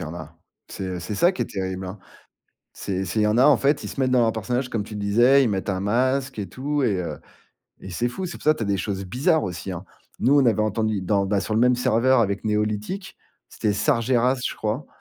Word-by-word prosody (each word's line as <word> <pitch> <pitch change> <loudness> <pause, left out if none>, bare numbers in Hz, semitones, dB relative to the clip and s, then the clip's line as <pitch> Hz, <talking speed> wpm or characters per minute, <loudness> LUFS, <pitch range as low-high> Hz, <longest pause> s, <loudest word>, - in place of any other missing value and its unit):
y - - -3
en 80 +2 -7
a. 80 -2 -10 0.3
C'est 95 -1 -5
c'est 90 +5 -5
ça 175 - +4
qui 190 - -3
est - - -1
terrible, 95 -1 -4
hein, 95 +2 -6 0.8
c'est 95 -1 -3
c'est 95 +5 -1
il - - +3
y - - +3
en 105 +2 +2
a, 130 - +6
en 150 - +6
fait, 145 +1 +1
ils - - -4
se - - -9
mettent 130 -1 +1
dans 125 -1 +4
leurs 115 -1 +3
personnages 125 +4 -2
comme 110 -4 -2
tu 105 0 -8
disais, 120 +7 +4
ils 125 - +2
mettent 100 -1 -2
un 95 -1 -2
masque 130 +5 0
et 100 - -3
tout 145 +2 -2
et 105 -7 +1
heu 85 - -5 0.6
et 95 - -8
c'est 120 +7 -1
fou. 155 +10 -5
C'est 175 - -5
pour - - -16
ça 155 - +6
que - - -14
tu - - -3
as - - -4
des 100 0 +1
choses 95 +1 -3
bizarres 145 - +1
aussi, 90 0 -5
hein. 90 0 -6 0.3
Nous 140 +3 +4
on 130 - +3
avait 110 -2 +3
entendu 110 -1 0
dans 100 +1 +1
bah, 100 0 +1
sur 110 - -4
le 110 - +2
même 125 0 +4
serveur 125 +2 +3
avec 100 -2 0
NeoLithic, 105 - -2 0.3
c'était 105 - -1
Sargeras, 120 +4 +2
je - - -6
crois 110 +7 -3
110 Hz, 260 wpm, -23 LUFS, 100-130 Hz, 0.8 s, a